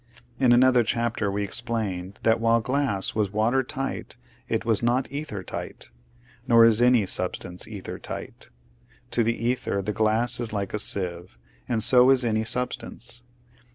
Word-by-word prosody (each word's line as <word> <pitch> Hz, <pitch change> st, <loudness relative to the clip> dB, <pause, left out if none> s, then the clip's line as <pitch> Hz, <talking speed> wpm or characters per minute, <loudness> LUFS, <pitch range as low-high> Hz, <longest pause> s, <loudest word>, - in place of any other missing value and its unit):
In 130 Hz, -2 st, +4 dB
another 125 Hz, 0 st, +5 dB
chapter 115 Hz, -2 st, -1 dB
we 100 Hz, +1 st, -2 dB
explained 100 Hz, -3 st, -3 dB
that, 110 Hz, 0 st, +3 dB
while 115 Hz, 0 st, +3 dB
glass 130 Hz, -5 st, -1 dB
was 105 Hz, -2 st, 0 dB
water 110 Hz, +5 st, +1 dB
tight 135 Hz, +1 st, -5 dB, 0.3 s
it -, -, -1 dB
was 115 Hz, -3 st, +1 dB
not 120 Hz, +3 st, +1 dB
ether 140 Hz, -9 st, -5 dB
tight; -, -, -7 dB, 0.6 s
nor 115 Hz, -1 st, +7 dB
is 115 Hz, 0 st, +4 dB
any 120 Hz, -4 st, +4 dB
substance 90 Hz, 0 st, -2 dB
ether 105 Hz, -4 st, -7 dB
tight. -, -, -7 dB, 0.6 s
To 120 Hz, -, +2 dB
the 115 Hz, +1 st, 0 dB
ether 120 Hz, -3 st, -1 dB
the 100 Hz, +2 st, -3 dB
glass 110 Hz, +3 st, +1 dB
is 120 Hz, -2 st, -3 dB
like 100 Hz, -2 st, -3 dB
a 105 Hz, -, -1 dB
sieve, 90 Hz, -3 st, -2 dB, 0.3 s
and 110 Hz, -2 st, +1 dB
so 125 Hz, +2 st, +6 dB
is 130 Hz, -2 st, +3 dB
any 110 Hz, -1 st, 0 dB
substance. 120 Hz, 0 st, -4 dB
115 Hz, 155 wpm, -25 LUFS, 105-120 Hz, 0.6 s, nor